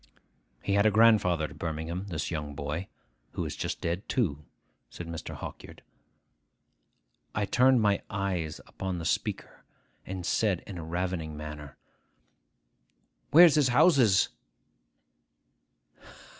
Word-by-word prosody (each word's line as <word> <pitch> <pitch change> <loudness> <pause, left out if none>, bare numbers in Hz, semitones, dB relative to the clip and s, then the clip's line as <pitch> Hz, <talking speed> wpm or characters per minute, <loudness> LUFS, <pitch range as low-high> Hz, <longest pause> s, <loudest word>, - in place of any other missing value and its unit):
'He 100 - 0
had 100 +1 +4
a - - +6
grandfather 105 -6 +4
at 75 0 -10
Birmingham, 85 +4 -4
this 85 -4 -3
young 75 -3 -4
boy, 75 +6 -4 0.5
who - - -3
is - - -5
just - - -4
dead 85 +5 -3
too,' 80 - 0 0.5
said 85 - -8
Mr. 85 -1 -6
Hawkyard. - - -9 1.5
I 105 - +1
turned 125 +2 +4
my 100 -1 +2
eyes 95 -5 -2
upon 95 -1 -5
the 85 - -5
speaker, - - -3 0.4
and 95 -2 -6
said 100 -2 +1
in 95 -4 -7
a - - -6
ravening 85 -2 -3
manner, 75 -2 -8 1.5
'Where's 165 +1 +8
his 150 -3 +4
houses? 125 - +4
90 Hz, 120 wpm, -29 LUFS, 80-105 Hz, 1.5 s, Where's